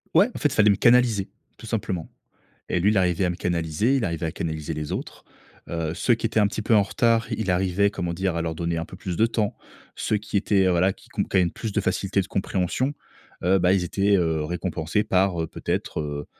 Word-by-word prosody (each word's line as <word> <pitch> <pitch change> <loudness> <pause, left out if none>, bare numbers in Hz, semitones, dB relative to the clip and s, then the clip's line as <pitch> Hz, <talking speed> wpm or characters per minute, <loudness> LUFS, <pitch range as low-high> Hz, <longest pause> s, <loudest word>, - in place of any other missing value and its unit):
Ouais, 210 +6 +6
en - - -6
fait, 150 - +3
il 140 - -4
fallait 105 -1 +5
me 100 - +4
canaliser, 120 -4 +4 0.3
tout - - -12
simplement 95 -6 -3 0.6
et 90 - +1
lui, 100 +4 +3
il 105 - +2
arrivait 90 0 +1
à 90 - +1
me - - -5
canaliser. 85 - 0
Il 130 -5 +1
arrivait 85 -2 -2
à - - -3
canaliser 80 -1 -4
les 75 -1 -4
autres. - - -6 0.4
Heu, 85 -1 -2
ceux 120 - +2
qui 115 0 -1
étaient 110 - 0
un 105 - +5
petit 100 +2 -2
peu 110 +1 +3
en 105 - +5
retard, 115 +2 +2
il 110 -3 -2
arrivait, 95 +2 +2
comment 85 -4 -3
dire? 95 0 -1
À 85 - -1
leur 80 -1 -2
donner 85 +1 -2
un 80 - -3
peu - - -11
plus 90 -2 -5
de 110 - +4
temps. 110 -3 -1 0.4
Ceux 105 - 0
qui 105 0 -3
étaient, 100 -1 +2
heu, - - +3
voilà, 90 +2 +3
qui - - -21
qu'on - - -1
qui - - 0
avaient 90 -2 +4
plus 110 +5 -5
de 105 - 0
facilité 100 0 0
de 95 - -7
compréhension, 95 +8 -1 0.5
heu, 95 +2 +4
bah, 90 0 +3
ils 95 -2 +2
étaient, 100 +3 +2
heu, 80 -3 0
récompensés 85 +3 -1
par, 95 -4 +1
heu, 80 - -2
peut - - -11
être, - - -1
heu 75 -1 -4
95 Hz, 250 wpm, -24 LUFS, 85-105 Hz, 0.6 s, Ouais